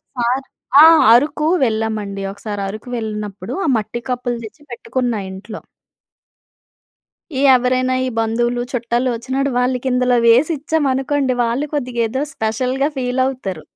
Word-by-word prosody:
ఒకసారి 250 Hz, +2 st, -1 dB, 0.4 s
ఆ! -, -, +10 dB, 0.3 s
అరుకు 300 Hz, +5 st, +2 dB, 0.2 s
వెళ్ళామండి. 220 Hz, -3 st, -2 dB
ఒకసారి 205 Hz, 0 st, -6 dB
అరుకు 215 Hz, +4 st, -8 dB
వెళ్ళినప్పుడు 210 Hz, -4 st, -5 dB
ఆ -, -, 0 dB
మట్టి 220 Hz, +3 st, -5 dB
కప్పులు 245 Hz, -1 st, -2 dB
తెచ్చి 220 Hz, +8 st, -13 dB
పెట్టుకున్నా 245 Hz, -2 st, -2 dB
ఇంట్లో. 210 Hz, +3 st, -8 dB, 1.8 s
ఈ -, -, +1 dB
ఎవరైనా 255 Hz, +1 st, +1 dB
ఈ -, -, -1 dB
బంధువులు 240 Hz, +2 st, 0 dB
చుట్టాలు 240 Hz, 0 st, -1 dB
వచ్చినప్పుడు 265 Hz, +4 st, -2 dB
వాళ్ళకిందలో 250 Hz, 0 st, +1 dB
వేసిచ్చామనుకోండి, 275 Hz, 0 st, +1 dB
వాళ్ళు 245 Hz, +6 st, -1 dB
కొద్దిగా 250 Hz, -4 st, -1 dB
ఏదో 260 Hz, +5 st, -2 dB
స్పెషల్‌గా 255 Hz, +4 st, -1 dB
ఫీల్ 250 Hz, 0 st, 0 dB
అవుతారు. 195 Hz, -11 st, -4 dB
245 Hz, 120 wpm, -18 LUFS, 225-260 Hz, 1.8 s, ఆ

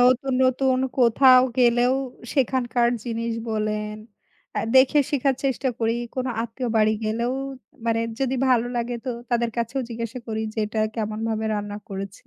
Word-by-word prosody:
নতুন, 255 Hz, +2 st, +3 dB
নতুন 255 Hz, 0 st, +2 dB, 0.2 s
কোথাও 255 Hz, +1 st, +6 dB, 0.2 s
গেলেও 245 Hz, +1 st, +4 dB, 0.4 s
সেখানকার 245 Hz, -3 st, +1 dB, 0.2 s
জিনিস 230 Hz, -1 st, -2 dB, 0.2 s
বলেন, 210 Hz, -1 st, -2 dB, 0.8 s
দেখে 265 Hz, +3 st, +6 dB
শিখার 275 Hz, -1 st, +2 dB
চেষ্টা 265 Hz, 0 st, 0 dB
করি। 225 Hz, 0 st, +1 dB, 0.2 s
কোন 255 Hz, -1 st, -2 dB, 0.2 s
আত্মীয় 235 Hz, +2 st, -4 dB
বাড়ি 215 Hz, 0 st, +4 dB
গেলেও 235 Hz, +3 st, -1 dB, 0.5 s
মানে 230 Hz, 0 st, +2 dB, 0.2 s
যদি 265 Hz, 0 st, +1 dB
ভালো 245 Hz, -2 st, +3 dB
লাগে 240 Hz, +1 st, -2 dB
তো 260 Hz, -, -2 dB, 0.2 s
তাদের 235 Hz, -1 st, +1 dB
কাছেও 235 Hz, +3 st, -1 dB
জিজ্ঞাসা 230 Hz, +1 st, -5 dB
করি 220 Hz, -1 st, -3 dB
যে -, -, -6 dB
"এটা 215 Hz, +1 st, -2 dB, 0.2 s
কেমনভাবে 220 Hz, 0 st, -2 dB
রান্না 205 Hz, 0 st, -4 dB
করেছে।" 195 Hz, 0 st, -7 dB
235 Hz, 140 wpm, -24 LUFS, 220-255 Hz, 0.8 s, কোথাও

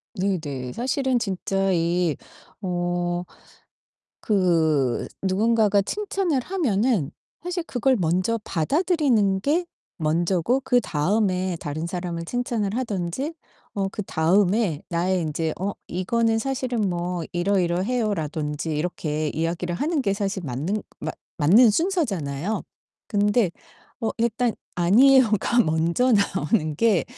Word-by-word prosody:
네네. 155 Hz, -, -2 dB
사실은 260 Hz, +1 st, 0 dB
진짜 195 Hz, -2 st, -1 dB
이 170 Hz, -2 st, +1 dB, 0.5 s
어 175 Hz, -1 st, -1 dB, 1.0 s
그 160 Hz, -, +2 dB, 0.2 s
누군가가 205 Hz, +1 st, +3 dB
칭찬을 385 Hz, -, -1 dB
하면은 235 Hz, -, 0 dB, 0.3 s
사실 355 Hz, 0 st, -2 dB
그걸 265 Hz, -3 st, +1 dB
먼저 185 Hz, +5 st, 0 dB
받아들이는 235 Hz, -, +1 dB
게 320 Hz, -, +1 dB, 0.3 s
먼저고 170 Hz, +8 st, +1 dB
그다음에 190 Hz, -, +1 dB
다른 155 Hz, +3 st, -4 dB
사람을 170 Hz, -1 st, -4 dB
칭찬을 230 Hz, -1 st, -2 dB
하든지 230 Hz, -, -2 dB, 0.4 s
어 195 Hz, -1 st, 0 dB
그다음에 190 Hz, -1 st, +1 dB
나의 180 Hz, +2 st, 0 dB
인제 160 Hz, 0 st, -2 dB
"어 195 Hz, +2 st, 0 dB, 0.2 s
이거는 225 Hz, +5 st, 0 dB
사실은 255 Hz, -1 st, -2 dB
뭐 175 Hz, 0 st, -2 dB
이러이러해요." 195 Hz, +5 st, +1 dB
라든지 155 Hz, -1 st, -3 dB
이렇게 155 Hz, -2 st, -2 dB
이야기를 170 Hz, +3 st, -2 dB
하는 305 Hz, -, 0 dB
게 200 Hz, -, +1 dB
사실 195 Hz, -1 st, -2 dB
맞는 155 Hz, +11 st, -2 dB, 0.2 s
맞 -, -, -4 dB, 0.2 s
맞는 210 Hz, +10 st, +6 dB
순서잖아요. 210 Hz, -, -1 dB, 0.4 s
근데 205 Hz, -2 st, +2 dB, 0.5 s
어 225 Hz, -, 0 dB
일단 235 Hz, +1 st, +1 dB, 0.2 s
"아니에요."가 235 Hz, +4 st, +4 dB
먼저 165 Hz, +9 st, +1 dB
나오는 200 Hz, -5 st, +1 dB
게 210 Hz, +2 st, +2 dB
195 Hz, 250 characters per minute, -24 LUFS, 170-235 Hz, 1.0 s, 맞는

